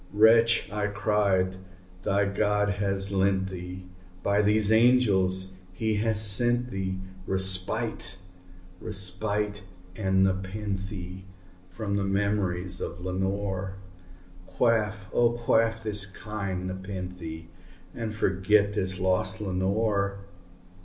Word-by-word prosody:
"Wretch," 115 +2 +5
I 105 0 -1
cried, 100 -2 +1 0.4
"thy 100 +2 +1
God 105 +1 +1
hath 100 -1 -1
lent 95 0 +1
thee 90 0 -7 0.4
by 100 +1 +2
these 105 0 +3
angels 100 -6 +3 0.2
he 110 +3 -1
hath 110 +1 0
sent 120 +4 +2
thee 95 -1 -3 0.3
Respite 95 0 +1 0.6
respite 105 +1 -1 0.3
aad 95 -2 +2
nepenthé 95 -1 -3 0.5
from 100 +2 -4
thy - - 0
memories 95 -2 0
of 85 - -5
Lenore! 95 +1 -3 0.7
Quaff, 105 -3 0
oh 120 -1 +3
quaff 115 -1 +1
this 105 -2 +4
kind 100 -2 -5
nepenthé, 90 -3 -6 0.5
and 110 -2 -5
forget 100 +1 +2
this 95 -2 -1
lost 95 0 +1
Lenore!" 100 +1 -1
100 Hz, 100 wpm, -27 LUFS, 95-105 Hz, 0.7 s, Wretch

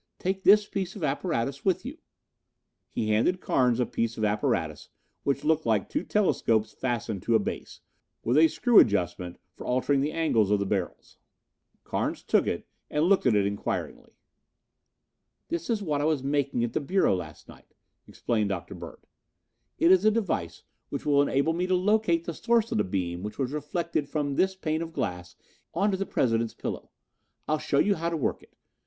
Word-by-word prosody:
Take 190 +1 -2
this 210 +1 +6
piece 190 -1 -4
of 195 - -7
apparatus 140 -3 -1
with 185 +2 +1
you." 290 +5 -7 0.9
He 110 - -2
handed 115 +13 +2
Carnes 125 -7 +2
a 125 - +2
piece 115 0 -2
of 110 - 0
apparatus 105 0 -1 0.3
which 140 - -1
looked 155 -3 +1
like 110 -4 +2
two - - -1
telescopes 115 - +1
fastened 115 -6 -3
to 115 - +1
a - - +5
base, 100 - -6 0.4
with 120 - +1
a 160 +2 +7
screw 240 +6 +5
adjustment 90 -3 +1 0.2
for - - -9
altering 130 +2 +1
the 145 +2 0
angles 120 -12 +2
of 105 - +3
the 100 - -1
barrels. 95 -2 -4 0.6
Carnes - - -2
took - - +2
it - - -3 0.2
and 150 +1 0
looked 190 -6 +3
at 115 - +4
it 100 -1 +3
inquiringly. 100 0 -4 1.4
"That 170 -1 -3
is 220 -3 0
what 150 -5 -1
I - - 0
was 155 -4 +1
making 140 -3 0
at 120 - -2
the - - 0
Bureau 180 - +2
last 80 -4 -8
night," - - -17 0.3
explained 110 -3 -1
Dr. 95 -3 -4
Bird. - - -10 0.7
"It 170 - +4
is 190 0 +5
a 215 - +6
device 205 - -2 0.3
which - - -5
will 145 -1 +4
enable 140 +3 +1
me 180 +2 -1
to 185 - +2
locate 185 -3 +2
the 170 - -3
source 230 +5 +1
of - - 0
the - - +3
beam 90 -2 -3
which 105 +2 -6
was 135 -2 -1
reflected 150 0 -2
from 145 -1 -1
this 190 +4 +2
pane 160 -3 -2
of 165 0 -6
glass 90 - -4 0.4
onto 195 +3 +2
the 195 +1 -3
President's 115 -2 0
pillow. - - -5 0.6
I'll 155 0 +1
show 140 - -1
you 200 +7 +4
how 170 -2 -2
to 165 - -2
work 145 - -1
it. - - -22
145 Hz, 185 wpm, -27 LUFS, 110-180 Hz, 1.4 s, a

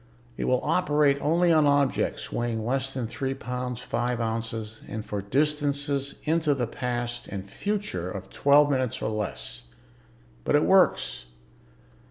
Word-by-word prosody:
It - - -3
will 125 - +2
operate 150 -3 +3
only 170 +3 +3
on 155 -2 +5
objects 140 -2 +1
weighing 115 -2 -2
less 135 +2 0
than 130 -3 -3
three 135 +4 -3
pounds, 125 -1 -4
five 120 +1 -1
ounces 115 -1 -3
and 110 -1 -5
for 105 -1 -3
distances 145 +3 0
into 160 -2 +2
the 125 -3 0
past 120 0 -3
and 100 -1 -6
future 195 - -3
of 95 0 -7
twelve 145 +1 +5
minutes 130 -2 0
or 110 - -2
less. 105 - -4 0.8
But - - +2
it 150 - +4
works." 180 - +3
130 Hz, 145 wpm, -26 LUFS, 115-145 Hz, 0.8 s, on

